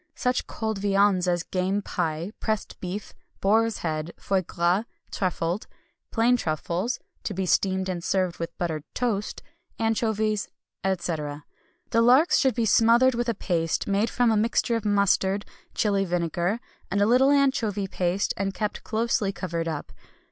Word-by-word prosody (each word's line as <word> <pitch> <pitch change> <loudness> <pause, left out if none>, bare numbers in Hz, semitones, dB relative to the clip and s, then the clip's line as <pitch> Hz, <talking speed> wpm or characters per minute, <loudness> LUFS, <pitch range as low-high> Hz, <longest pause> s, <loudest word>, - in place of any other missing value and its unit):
Such 250 -1 0
cold 220 -2 -3
viands 195 -2 +3
as 175 -1 +1
game 190 +3 -1
pie, 165 +1 -2
pressed 215 -2 -3
beef, 190 +3 -5 0.3
boar's 225 +3 +2
head, 155 +1 -3
foie 195 -1 0
gras 175 +4 0 0.3
(truffled), 180 0 -1 0.4
plain 235 +2 +3
truffles 175 - -2 0.2
(to 205 - -4
be 190 0 -1
steamed 190 +1 +1
and 175 -2 -3
served 185 -1 0
with 165 0 -5
buttered 160 -5 -2
toast) 220 -5 -2 0.3
anchovies, 220 -2 0 0.4
etc. 160 -6 -2 0.5
The 230 - +4
larks 255 +8 +5
should 260 -4 +2
be 235 - +1
smothered 230 +4 +5
with 240 0 -1
a 230 - 0
paste 165 -4 -1
made 200 +3 +1
from 245 -1 +2
a - - +3
mixture 230 +2 +1
of 225 -2 -3
mustard, 200 -1 +2 0.3
Chili 200 -2 +2
vinegar, 175 +3 -1 0.3
and 200 - 0
a 205 - +4
little 250 +5 +5
anchovy 245 -8 +2
paste, 185 +1 0
and 195 0 -2
kept 210 -1 -3
closely 220 -2 0
covered 170 -4 -3
up. 150 -10 -4
200 Hz, 150 wpm, -26 LUFS, 180-225 Hz, 0.5 s, larks